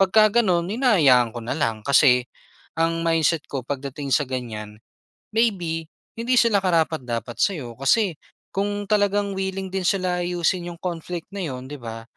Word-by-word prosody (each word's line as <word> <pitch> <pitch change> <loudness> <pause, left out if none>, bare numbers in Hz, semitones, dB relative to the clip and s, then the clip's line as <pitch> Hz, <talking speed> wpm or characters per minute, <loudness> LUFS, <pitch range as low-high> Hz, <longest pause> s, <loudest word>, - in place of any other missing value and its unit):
'Pag 195 -1 +4
ka 215 -1 +7 0.2
gano'n 175 -6 +1
hinahayaan 160 - +4
ko 120 - -6
na 120 - -3
lang 115 -8 -1
kasi 130 -3 +5 0.5
ang 165 0 +1
mindset 165 -1 +2
ko 135 -3 -4
pagdating 140 +1 -5
sa 145 - +3
ganyan, 110 -5 -5 0.6
maybe, 175 -8 0 0.3
hindi 240 +2 0
sila 230 -4 +3
karapat-dapat 130 - -1
sa'yo 135 -12 -1
kasi 175 - +2 0.4
kung 205 +1 -1
talagang 205 -1 +2
willing 190 0 -3
din 190 -1 -2
sila 180 -2 +1
ayusin 175 0 0
'yong 170 0 -11
conflict 175 -1 -5
na - - -5
'yon 130 -4 -5
'di 145 - -6
ba, 115 -1 -7
165 Hz, 160 wpm, -23 LUFS, 130-195 Hz, 0.6 s, ka